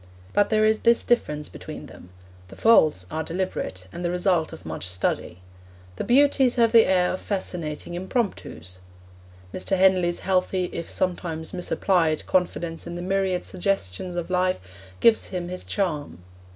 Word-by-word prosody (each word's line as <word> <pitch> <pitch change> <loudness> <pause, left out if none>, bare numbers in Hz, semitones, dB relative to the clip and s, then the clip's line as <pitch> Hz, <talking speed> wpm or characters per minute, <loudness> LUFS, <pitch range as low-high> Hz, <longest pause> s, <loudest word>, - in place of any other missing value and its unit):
But 205 - +3
there 215 -1 +3
is 220 0 +3
this 235 0 +3
difference 150 -11 0
between - - -9
them 90 - -14 0.4
the - - -12
faults 155 - +4
are 160 - -2
deliberate, 165 - -4
and 175 - -6
the 175 - 0
result 180 -2 +1
of - - -11
much 80 +4 -3
study; 90 0 -2 0.6
the - - -2
beauties 270 0 +4
have 230 -2 +3
the 230 -1 +6
air 180 -1 +2
of 185 - -5
fascinating 175 -5 -4
impromptus. 175 - -4 0.7
Mr. 190 +1 -1
Henley's 185 -2 +3
healthy, 185 -1 0
if 170 - -5
sometimes 170 -3 -2
misapplied, 175 -3 +1
confidence 170 -2 -1
in 170 - -6
the 175 - -5
myriad 190 -1 0
suggestions 180 - -2
of 175 +1 -4
life 185 0 +1 0.4
gives 230 -1 +5
him 175 -2 -5
his 180 0 -4
charm. 150 - -3
180 Hz, 150 wpm, -24 LUFS, 160-195 Hz, 0.7 s, the